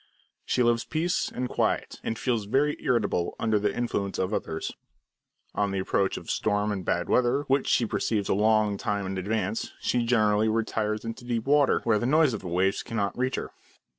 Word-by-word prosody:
She 125 - +2
loves 120 -1 +2
peace 165 +3 -1
and 125 +1 -3
quiet, - - -1
and 115 - -2
feels 115 -5 -1
very 140 +7 +1
irritable 105 -8 0
under 110 -2 +2
the 105 0 +1
influence 100 -4 -2
of 95 +3 -1
others. 80 -5 -3 0.8
On 100 -1 0
the 100 - -2
approach 95 +1 0
of - - -9
storm 105 0 0
and 95 -2 -3
bad 90 +1 -1
weather, 125 +3 +2
which 135 -1 +1
she 120 - +3
perceives 105 -1 -1
a - - +2
long 105 0 +2
time 100 -1 -1
in 95 0 -3
advance, 105 +1 -2
she 120 - 0
generally 110 -2 +3
retires 110 -1 -1
into 115 +2 -6
deep 120 -2 -2
water, 145 0 +3
where 110 -3 +2
the 120 - -1
noise 150 -1 +4
of 110 - -3
the 95 - -7
waves 95 +3 +1
cannot 105 -3 -2
reach 130 +1 0
her. - - -5
110 Hz, 195 wpm, -27 LUFS, 100-120 Hz, 0.8 s, noise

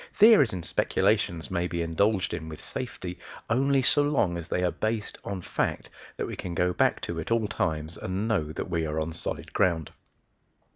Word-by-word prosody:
Theories 215 - +7
and 90 -3 -4
speculations 80 +2 +1
may 90 -1 0
be 85 -1 -2
indulged 95 +4 +1
in 80 -2 -4
with 80 - -8
safety 90 -9 -6 0.3
only 135 +2 +3
so 145 - +5
long 145 -12 +2
as 85 -1 -5
they 90 - 0
are 90 - +2
based 110 0 -2
on 95 -3 -4
facts - - -2 0.3
that - - -1
we - - -5
can 85 -2 -5
go 90 +1 +2
back - - +2
to 85 -1 -4
at 80 - -5
all 115 -2 +2
times 80 -3 -2
and 95 +4 -2
know 80 -9 0
that - - -4
we 85 -2 -1
are 75 +1 -2
on 80 +1 -2
solid 85 - -4
ground. 85 -4 +1
90 Hz, 195 wpm, -27 LUFS, 80-110 Hz, 0.3 s, Theories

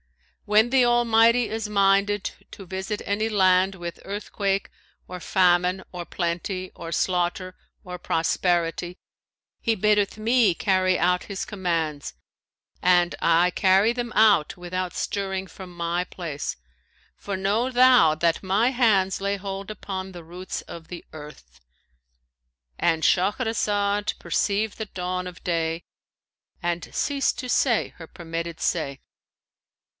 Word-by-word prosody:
When 215 +3 +3
the 265 -1 +5
Almighty 240 0 +4
is 220 -1 -4
minded 200 0 +2 0.2
to 195 - -10
visit 190 +3 -4
any 215 +2 0
land 190 -2 +3
with 175 -2 -7
earthquake 200 0 -2 0.4
or 180 0 -7
famine 180 0 +2
or 175 -1 -5
plenty 180 +2 -3
or 165 -1 -8
slaughter 180 +2 -1 0.3
or 180 -1 -6
prosperity, 175 +1 0 0.6
He 225 - +1
biddeth 210 0 +2
me 225 -2 +3
carry 185 -2 +2
out 180 +1 +1
His 200 -1 -5
commands 165 -7 -3 0.7
and 175 -1 +3
I 170 +2 +4
carry 195 +4 +3
them 240 -1 -4
out 210 -6 +4
without 180 0 -4
stirring 190 -1 -3
from 185 -1 -11
my 175 0 -2
place; 165 -5 -5 0.6
for 200 -2 -5
know 205 +6 0
thou 250 -11 +5
that 165 +3 0
my 205 +7 +2
hands 205 -7 +2
lay 200 0 -1
hold 195 +1 -6
upon 190 -2 -6
the 175 -2 -10
roots 180 +3 -7
of 165 -1 -10
the 175 -2 -8
earth,' 110 - -12 1.2
"—And 165 -2 +1
Shahrazed 205 0 +1
perceived 210 +1 -1
the 220 - -2
dawn 180 -1 -4
of 180 - -11
day 165 -1 -1 0.8
and 175 -1 -3
ceased 280 -1 0
to 255 - -5
say 240 -1 +2
her 165 - -10
permitted 165 0 -6
say. 140 -1 -1
190 Hz, 130 wpm, -24 LUFS, 175-210 Hz, 1.2 s, the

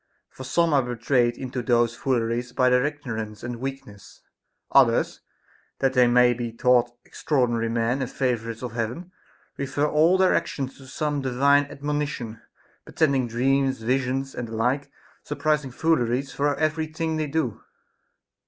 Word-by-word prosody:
For 130 - -10
some 165 +4 +1
are 140 - +5
betrayed 120 0 0
into 130 -1 -4
those 120 -1 +2
fooleries 120 -1 -1
by 130 0 +3
their 125 0 +4
ignorance 110 -8 -6
and 120 0 -4
weakness; 125 -6 -8 0.5
others, - - +3 0.6
that 135 -1 +1
they 125 -2 +5
may 125 0 +5
be 120 0 -4
thought 120 +1 +3 0.2
extraordinary 120 -5 0
men 115 +3 0
and 130 - -2
favorites 115 -3 -2
of 125 - -4
Heaven, 120 +10 -4 0.5
refer 140 +1 -1
all 160 +5 +4
their 185 -1 +4
actions 135 -2 -2
to 135 - -13
some 145 +2 -2
divine 140 +2 +3
admonition 140 -5 -4 0.4
pretending 140 -5 +1
dreams, 130 +1 +1
visions, 130 +2 -1
and 120 - -5
the 115 - -7
like 125 +5 0 0.3
surprising 150 -1 -1
fooleries 130 -2 0
for 145 0 0
every 155 +2 0
thing 160 0 -3
they 155 -1 -1
do. 140 -7 -2
130 Hz, 145 wpm, -24 LUFS, 120-145 Hz, 0.6 s, are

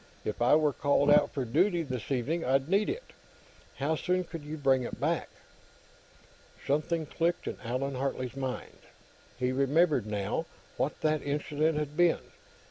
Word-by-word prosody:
If 105 - -3
I 125 +5 +6
were 150 -2 +3
called 145 +1 +3
out - - +5
for 135 -4 -2
duty, 170 - +2
this 130 -5 -5
evening, 145 +6 0
I'd 135 +1 +2
need 200 +4 +2
it. 450 +7 -5 0.6
How 150 +4 0
soon 180 +3 0
could 165 -2 -8
you 150 +2 -6
bring 135 -3 +3
it 120 - -5
back?" - - 0 1.4
Something 155 +3 0
clicked 170 +3 -1
in - - -4
Allan 130 +4 -2
Hartley's 130 -1 -3
mind. 130 -2 -5 0.6
He 125 0 0
remembered, 140 - +2
now, 105 +10 -2 0.3
what 145 - -2
that 155 -1 +1
incident 150 +2 0
had 150 -1 -3
been. 175 0 +3
145 Hz, 155 wpm, -30 LUFS, 130-160 Hz, 1.4 s, I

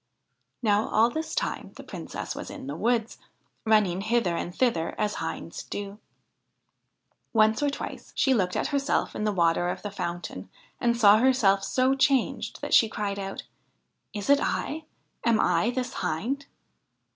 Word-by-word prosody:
Now 210 -1 +3
all 225 +2 +3
this 315 +3 -4
time - - -3
the - - -10
Princess - - -6
was - - -7
in 280 -3 -8
the 280 - -5
wood, 230 -1 0 0.5
running 210 -4 +3
hither 220 -5 +1
and 175 - -3
thither 175 -6 0
as 210 -1 0
hinds - - -5
do. 205 0 -6 1.3
Once 220 +1 +4
or 290 - +2
twice 280 - -7
she 270 - +3
looked 185 -6 +1
at - - 0
herself 280 -1 0
in 210 - -2
the 210 - +2
water 175 -1 +2
of - - -4
the 205 - -4
fountain, 175 - -5 0.3
and 235 -1 +2
saw 210 -2 +7
herself 220 -6 +3
so 255 +5 +2
changed 270 -2 +1
that - - -3
she 225 - +6
cried 200 -2 -3
out: 195 0 -5 0.4
' - - -50
Is 205 -1 -5
it 285 0 +6
I? 315 +1 -2 0.4
Am 230 -2 +3
I 180 +5 +2
this 250 0 -3
hind 255 - -2
215 Hz, 165 wpm, -27 LUFS, 195-255 Hz, 1.3 s, saw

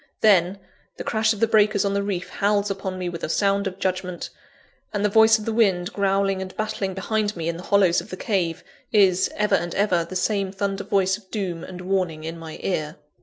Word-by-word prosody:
Then, 190 -3 +4 0.4
the - - -5
crash 220 -1 +1
of 215 - -3
the - - +6
breakers 210 -2 +3
on 200 - 0
the 200 - +1
reef 195 -3 -3
howls 205 0 +1
upon 190 -1 -4
me 180 -1 -3
with 170 -1 -6
a - - -2
sound 200 +2 +1
of 185 -1 -5
judgment; 185 -2 -3 0.6
and 205 -1 -1
the - - +3
voice 220 +1 +6
of 215 - -8
the 225 - -1
wind, 195 -5 +2
growling 195 -1 +1
and 185 0 -7
battling 200 -3 -2
behind 210 +2 -1
me 165 -2 -4
in 170 0 -2
the - - -8
hollows 195 -4 +4
of - - -14
the 185 - -6
cave, 180 -7 -1 0.3
is, 190 -3 +4
ever 210 0 0
and 175 0 0
ever, 185 -4 +2
the 170 +3 -9
same 195 +1 0
thunder 200 0 -2
voice 190 -1 +1
of 190 -3 -25
doom 185 -6 -3
and 180 -1 -8
warning 180 -4 -1
in 165 +1 -6
my 160 -1 -8
ear. 155 -4 -2
195 Hz, 220 wpm, -23 LUFS, 180-205 Hz, 0.6 s, the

